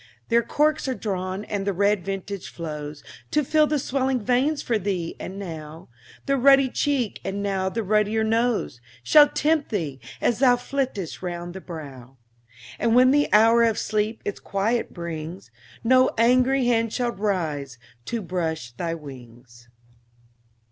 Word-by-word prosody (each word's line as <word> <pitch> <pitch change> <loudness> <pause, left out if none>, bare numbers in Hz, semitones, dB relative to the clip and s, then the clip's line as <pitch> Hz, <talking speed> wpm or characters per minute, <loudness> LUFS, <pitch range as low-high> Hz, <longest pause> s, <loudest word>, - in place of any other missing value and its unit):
There 235 0 +4
corks 295 +6 +1
are 260 - -1
drawn, 190 -1 -3
and 200 -1 -3
the 200 - +1
red 200 0 +1
vintage 195 +1 -5
flows, 150 -3 -7 0.3
To 300 - +1
fill 305 +2 +3
the 300 - 0
swelling 265 -1 0
veins 255 +6 +1
for 230 -3 0
thee, 180 -4 -3
and 190 - -7
now 160 -6 -8 0.4
The 275 0 +1
ruddy 270 +1 +5
cheek 270 -7 -1
and 200 +1 -3
now 190 -1 0
the 225 +3 -3
ruddier 210 +2 +1
nose 225 - 0 0.2
Shall 295 - +7
tempt 310 0 +1
thee, 155 - -3 0.2
as 240 - +1
thou 255 -2 +5
flittest 245 - -3
round 175 -1 -5
the 190 - -8
brow; 135 -7 -10 0.6
And 230 0 +2
when 255 +1 +6
the 290 +1 +2
hour 225 +2 +6
of 225 -2 +3
sleep 215 +1 -1
its 205 - -3
quiet 220 +4 -1
brings, 170 +1 -7 0.3
No 255 +2 +5
angry 255 +3 +3
hand 230 -2 +2
shall 245 0 -1
rise 160 - -2 0.3
to 230 -3 -3
brush 160 -8 -3
thy 165 +7 -3
wings. 120 -5 -13
205 Hz, 155 wpm, -24 LUFS, 170-245 Hz, 0.6 s, Shall